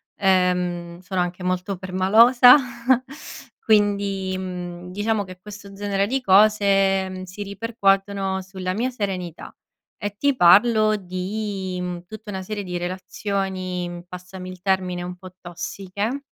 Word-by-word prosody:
ehm, 180 -3 +1
sono 185 0 -4
anche 180 +1 -3
molto 185 +2 -1
permalosa 220 +8 +6 1.1
quindi, 200 -3 +1
mhmm, 180 -1 -6
diciamo 205 +2 0
che 185 -1 -11
questo 205 0 -11
genere 200 0 -1
di 265 +3 -1
cose, 195 -2 +4
mhmm, 185 0 -7
si 185 +2 -9
ripercuotono 195 -2 0
sulla 185 -1 -4
mia 245 +4 -1
serenità, 185 -7 -5 0.4
e 205 0 -5
ti 280 +1 +2
parlo 215 +3 +5
di, 190 0 -4
mhmm, 180 -1 -5
tutta 215 +3 -10
una 190 -2 -4
serie 205 +1 -5
di 180 -1 -4
relazioni, 185 -1 -4
passami 180 +1 -9
il 185 -1 -12
termine, 185 -2 0
un 180 0 -6
po' 185 0 -12
tossiche 195 +7 -4
190 Hz, 130 wpm, -23 LUFS, 180-205 Hz, 1.1 s, permalosa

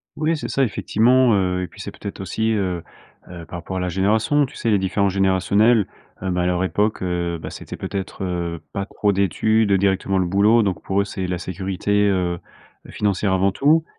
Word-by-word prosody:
Oui 155 +1 0
c'est - - -5
ça, 135 - +1
effectivement, 120 +1 +3
heu, 90 -2 +1
et 90 - -4
puis - - -12
c'est - - -5
peut-être 100 - -7
aussi, 110 +5 -1
heu 95 -5 -1 0.5
heu, 85 -2 -9
par 85 - -7
rapport 95 +2 -5
à - - -1
la 90 - -1
génération. 110 - +2
Tu 130 - -13
sais, 115 - -2
les 105 - +4
différences 95 +1 +1
générationnels, 100 +3 +3 0.3
heu, 95 - -2
ben, 90 0 0
à - - 0
leur 90 0 +1
époque, 105 +5 0
heu, 85 -2 -2
bah, - - -6
c'était, - - -8
peut-être, 95 0 -5
heu, 85 -2 -3
pas 100 -1 -2
trop 105 -1 0
d'études, 100 +2 +2
directement 95 0 +1
le 90 - +1
boulot. 105 +5 +4
Donc 95 -4 -1
pour 100 +1 +1
eux, - - +1
c'est 95 -1 -4
la 90 -1 -2
sécurité, 95 +3 -1
heu, 90 -2 0 0.5
financière 100 -1 0
avant 95 +1 +2
tout. 155 - +3
95 Hz, 205 wpm, -21 LUFS, 90-105 Hz, 0.5 s, les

